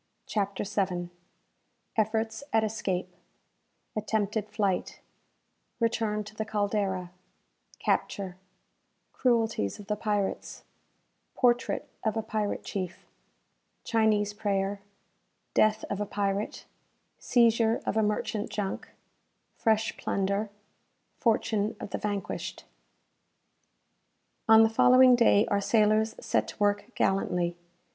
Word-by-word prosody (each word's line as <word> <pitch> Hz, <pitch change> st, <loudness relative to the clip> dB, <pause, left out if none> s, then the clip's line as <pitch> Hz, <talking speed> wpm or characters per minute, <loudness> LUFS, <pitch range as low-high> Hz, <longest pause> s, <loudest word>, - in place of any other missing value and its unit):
CHAPTER 200 Hz, -2 st, -1 dB
VII. 185 Hz, -4 st, -2 dB, 0.8 s
Efforts 220 Hz, +2 st, 0 dB
at 225 Hz, 0 st, +3 dB
Escape 190 Hz, -4 st, -2 dB, 0.8 s
Attempted 215 Hz, 0 st, -1 dB
Flight 200 Hz, -4 st, -1 dB, 0.8 s
Return 225 Hz, -2 st, 0 dB
to 210 Hz, +1 st, -11 dB
the 220 Hz, -, -3 dB
"Caldera" 205 Hz, -4 st, -1 dB, 0.7 s
Capture 190 Hz, -3 st, -1 dB, 0.8 s
Cruelties 225 Hz, -, +1 dB
of 205 Hz, -, -10 dB
the 210 Hz, -, -1 dB
Pirates 205 Hz, -2 st, -2 dB, 0.7 s
Portrait 245 Hz, 0 st, +1 dB, 0.2 s
of 220 Hz, 0 st, 0 dB
a 220 Hz, -, -1 dB
Pirate 210 Hz, -1 st, -2 dB
Chief 185 Hz, -3 st, -5 dB, 0.8 s
Chinese 215 Hz, -2 st, +2 dB
Prayer 200 Hz, -1 st, -1 dB, 0.7 s
Death 215 Hz, 0 st, +3 dB
of 200 Hz, 0 st, -3 dB
a 210 Hz, -, -2 dB
Pirate 200 Hz, +1 st, -2 dB, 0.5 s
Seizure 230 Hz, -1 st, +3 dB
of -, -, -1 dB
a 220 Hz, -, +3 dB
Merchant 210 Hz, 0 st, -1 dB
Junk 200 Hz, -2 st, -4 dB, 0.7 s
Fresh 220 Hz, -1 st, +1 dB
Plunder 200 Hz, +2 st, -1 dB, 0.7 s
Fortune 220 Hz, -2 st, +1 dB
of -, -, -7 dB
the -, -, -2 dB
Vanquished. 205 Hz, -2 st, -4 dB, 1.8 s
On 220 Hz, 0 st, +9 dB
the -, -, +6 dB
following 250 Hz, +3 st, +6 dB
day 225 Hz, -3 st, +5 dB
our 200 Hz, 0 st, +2 dB
sailors 215 Hz, +1 st, +3 dB
set -, -, 0 dB
to -, -, -9 dB
work 205 Hz, 0 st, +1 dB
gallantly. 180 Hz, -3 st, +1 dB
210 Hz, 105 wpm, -28 LUFS, 200-220 Hz, 1.8 s, On